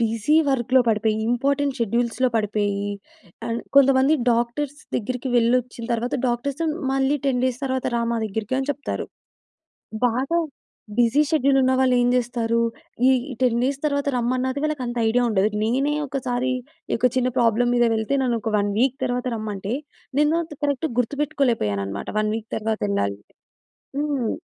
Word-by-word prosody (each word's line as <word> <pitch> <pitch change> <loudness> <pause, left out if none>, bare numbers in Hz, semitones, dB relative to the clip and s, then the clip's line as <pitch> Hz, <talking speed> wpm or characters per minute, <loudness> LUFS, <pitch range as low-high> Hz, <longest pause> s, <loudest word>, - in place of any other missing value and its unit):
Busy 230 +6 +2
వర్క్‌లో 260 -1 +3
పడిపోయి, 215 0 +2
important 280 +3 +1
షెడ్యూల్స్‌లో 235 +3 +1
పడిపోయి, 205 -1 -1 0.6
అండ్ 230 0 -2 0.2
కొంతమంది 275 +2 +5 0.2
డాక్టర్స్ 260 +5 -1 0.2
దగ్గరికి 250 +3 -3
వెళ్ళొచ్చిన 240 0 +1
తర్వాత, 235 +1 -1
డాక్టర్స్ 260 +5 -2 0.3
మళ్ళీ 270 +2 +2
10 250 -2 +1
డేస్ 255 +1 -1
తర్వాత 260 -1 -1
రా 235 - 0
మా 230 - 0
దగ్గరికి 220 +5 -3
అని 270 - -3
చెప్తారు. 290 - -5 1.0
బాగా 265 +8 +1 0.6
బిజీ 240 +5 +4
షెడ్యూలున్నవాళ్ళేం 260 -4 +3
జేస్తారు? 235 -1 0 0.5
ఈ - - +6 0.3
10 235 -2 +3
డేస్ 270 +1 0
తర్వాత 285 -1 0
రమ్మన్నది 255 +2 0
వాళ్ళకంత 255 -6 -2
ఐడియా 245 +2 +2
ఉండదు. 210 -1 +2
నేనే 270 +6 +1
ఒకసారి 255 -2 -1 0.4
ఇ - - +1
ఒక 250 - +4
చిన్న 255 0 +2
ప్రాబ్లమ్ 235 +1 +3
మీద 240 - +4
వెళ్తే, 220 +5 -1
నన్నొక 230 -3 -1
1 205 0 0
వీక్ 265 +1 +2
తర్వాత 245 0 -2
రమ్మంటే, 210 -1 -4 0.5
నేను 300 +2 +3
అంత 315 -2 -10
కరక్ట్‌గా 285 0 0
గుర్తుపెట్టుకోలేపోయాననమాట, 230 - -1
1 215 0 0
వీక్ 225 -1 -6
తర్వాతెళ్ళాలి 200 - -1 0.8
హ్మ్. 285 -6 -1
245 Hz, 135 wpm, -23 LUFS, 225-270 Hz, 1.0 s, ఈ